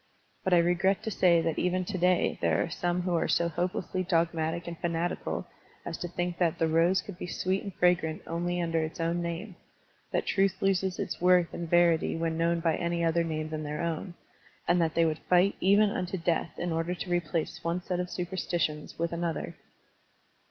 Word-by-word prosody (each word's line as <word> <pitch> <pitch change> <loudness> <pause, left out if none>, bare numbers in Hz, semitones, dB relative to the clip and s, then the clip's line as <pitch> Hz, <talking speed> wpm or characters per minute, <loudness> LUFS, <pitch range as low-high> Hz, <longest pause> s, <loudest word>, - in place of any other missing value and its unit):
But 185 -1 +3
I - - +6
regret 175 +3 +2
to 220 - -3
say 175 -4 +4
that 165 -1 -1
even 180 0 0
to 195 0 -3
day 180 0 +2
there - - +2
are - - -5
some 175 0 -1
who 180 -1 -1
are 170 - +1
so 170 0 +2
hopelessly 180 +2 -2
dogmatic 170 -1 0
and 170 - -4
fanatical 170 0 -2 0.4
as 170 - -4
to 175 - -3
think 175 0 -3
that 170 -3 +2
the 165 - +2
rose 165 +4 +3
could 190 -4 -9
be - - -5
sweet 185 +2 -1
and 200 - -6
fragrant 175 -3 +2
only 175 +1 -2
under 165 -1 0
its 155 +2 -6
own 170 +1 0
name, 170 +3 -5 0.5
that - - 0
truth 195 -1 +1
loses 190 -1 +1
its - - -4
worth 180 -1 +4
and 170 -1 -5
verity 170 -1 +3
when 165 0 -1
known 170 +1 +1
by 165 -1 +1
any 170 0 -1
other 165 0 +2
name 155 -1 -3
than 155 0 -4
their 150 +1 -3
own, 170 +2 -3 0.5
and 175 0 +3
that 160 -1 0
they 165 - +4
wotild 160 -1 0
fight 180 +2 +4
even 200 +2 +4
unto 185 0 -2
death 170 -2 -1
in 175 - -2
order 165 +2 -1
to 180 0 -6
replace 170 -2 -1
one 170 +2 0
set 180 0 -2
of 180 0 -2
superstitions 175 -4 -2
with 170 +1 -1
another. 170 -1 -3
175 Hz, 200 wpm, -29 LUFS, 165-180 Hz, 0.5 s, I